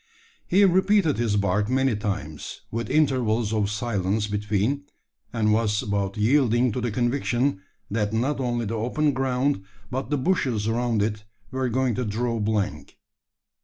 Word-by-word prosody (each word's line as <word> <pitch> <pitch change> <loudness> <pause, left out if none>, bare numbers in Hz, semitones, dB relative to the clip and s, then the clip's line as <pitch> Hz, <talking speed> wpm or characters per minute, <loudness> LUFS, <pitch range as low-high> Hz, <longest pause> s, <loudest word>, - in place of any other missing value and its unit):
He 200 +3 +5
repeated 190 -3 +3
his 115 -3 +1
bark 105 +2 +1
many 130 -2 +2
times, 100 -8 -4
with 115 +1 -3
intervals 120 -7 +2
of 105 -2 +1
silence 105 -2 -1
between 105 +7 -1 0.5
and 110 -2 +2
was 105 -2 +1
about 100 -1 -2
yielding 120 +1 +3
to 125 - -3
the 120 - -1
conviction, 120 0 0 0.3
that 105 -1 0
not 130 +6 0
only 120 -2 -1
the 110 - -3
open 125 +7 0
ground, 130 -3 0 0.3
but 130 +2 -3
the 145 - +1
bushes 130 - 0
around 115 -2 +1
it, 105 0 -3 0.3
were 130 -1 -1
going 130 +1 +1
to 125 - -1
draw 115 +2 -1
blank. 105 -2 -2
115 Hz, 150 wpm, -25 LUFS, 105-130 Hz, 0.5 s, He